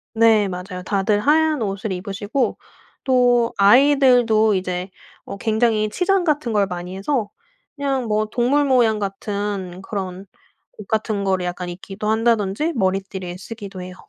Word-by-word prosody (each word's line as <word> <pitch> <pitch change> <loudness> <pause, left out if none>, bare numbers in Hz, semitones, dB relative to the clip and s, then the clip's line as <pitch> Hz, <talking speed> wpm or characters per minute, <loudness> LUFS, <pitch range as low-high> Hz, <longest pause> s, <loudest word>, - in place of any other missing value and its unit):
네. 220 -3 +4
맞아요. 180 0 -6
다들 205 +1 +1
하얀 305 0 +2
옷을 200 0 -3
입으시고 205 +7 -2 0.5
또 245 -3 +3
아이들도 245 -2 +5
이제 185 0 -3 0.3
어 - - -7
굉장히 220 0 +1
치장 365 - +1
같은 295 -7 0
걸 205 -2 +2
많이 180 0 -6
해서 215 +1 -1 0.5
그냥 270 -4 -1
뭐 215 0 +1
동물 250 +6 +1
모양 240 -5 +3
같은 200 -2 -4
그런 190 -2 -5 0.5
옷 210 - -10
같은 215 -2 -1
거를 190 -2 0
약간 180 0 -4
입기도 195 +4 -6
한다든지 225 - +1
머리띠를 190 -3 -2
쓰기도 200 -3 -8
해요. 180 0 -8
210 Hz, 290 characters per minute, -21 LUFS, 190-240 Hz, 0.5 s, 아이들도